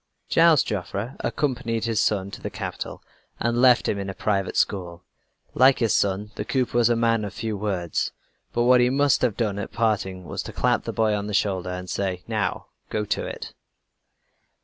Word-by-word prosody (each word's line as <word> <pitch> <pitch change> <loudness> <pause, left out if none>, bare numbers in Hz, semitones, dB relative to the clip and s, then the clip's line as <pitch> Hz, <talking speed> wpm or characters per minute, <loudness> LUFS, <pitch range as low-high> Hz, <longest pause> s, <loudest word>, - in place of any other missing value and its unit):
Gilles 165 -3 +6
Joffre 100 +5 -4
accompanied 120 -5 -1
his 115 -2 +1
son 100 -2 0
to - - -9
the - - -4
capital, - - -6 0.4
and 120 +1 +1
left 125 -2 +5
him 100 - 0
in 100 0 -4
a 95 - -6
private 100 -2 -1
school. 90 -3 -1 0.5
Like 130 +2 +5
his 115 -3 +1
son, 100 +1 0
the - - -4
cooper 130 -3 -1
was 120 -1 +4
a 120 - +3
man 115 -1 +2
of 100 -1 -6
few 110 -2 -3
words; 95 -5 -2 0.4
but 120 - +1
what 125 0 +6
he 125 - +4
must 140 +1 +3
have 120 -6 +1
done 105 -3 -1
at 100 - -5
parting 100 -5 -1
was - - -4
to - - -8
clap - - +1
the - - -2
boy 110 -1 +1
on 105 0 -2
the 105 - -2
shoulder, 95 -3 0
and 90 0 -5
say: 90 -1 -2
"Now, - - -2 0.2
go 105 -1 -1
to - - -2
it!" - - -7
105 Hz, 195 wpm, -24 LUFS, 95-120 Hz, 0.5 s, Gilles